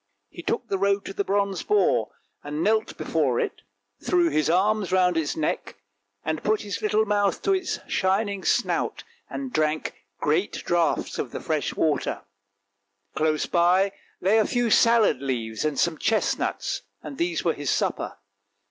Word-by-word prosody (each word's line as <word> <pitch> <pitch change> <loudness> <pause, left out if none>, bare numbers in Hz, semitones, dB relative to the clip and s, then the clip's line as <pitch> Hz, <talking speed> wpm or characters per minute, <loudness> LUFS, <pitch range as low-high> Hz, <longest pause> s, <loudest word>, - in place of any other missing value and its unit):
He - - -9
took 245 - -2
the 195 -2 -1
road 200 0 +1
to - - -6
the 200 - -1
bronze 200 -1 0
boar, 420 0 +2 0.3
knelt 185 +10 0
before 140 -7 0
it, - - -3 0.4
threw 350 -2 +3
his 155 - +1
arms 195 +2 +2
round 180 -1 +3
its 160 -2 -1
neck, 155 - -2 0.5
and 155 -1 -1
put 215 0 +1
his 205 -1 -5
little 215 0 +2
mouth 205 -1 +1
to 395 - +3
its 375 -1 -1
shining 195 +1 0
snout - - 0 0.3
and 270 -2 -5
drank 155 0 0 0.3
great 160 +7 +1
draughts 170 -1 0
of - - -2
the - - -6
fresh - - -2
water. - - 0 0.9
Close 155 0 +1
by 180 +3 +3 0.3
lay 200 +5 +3
a 215 - +2
few 245 -2 0
salad 230 - +4
leaves 115 -5 -2
and 155 -2 -1
some 165 +1 +1
chestnuts, 220 -1 0 0.2
and 275 - -8
these 340 +1 0
were - - +3
his - - -4
supper. - - -1
195 Hz, 155 wpm, -25 LUFS, 160-215 Hz, 0.9 s, salad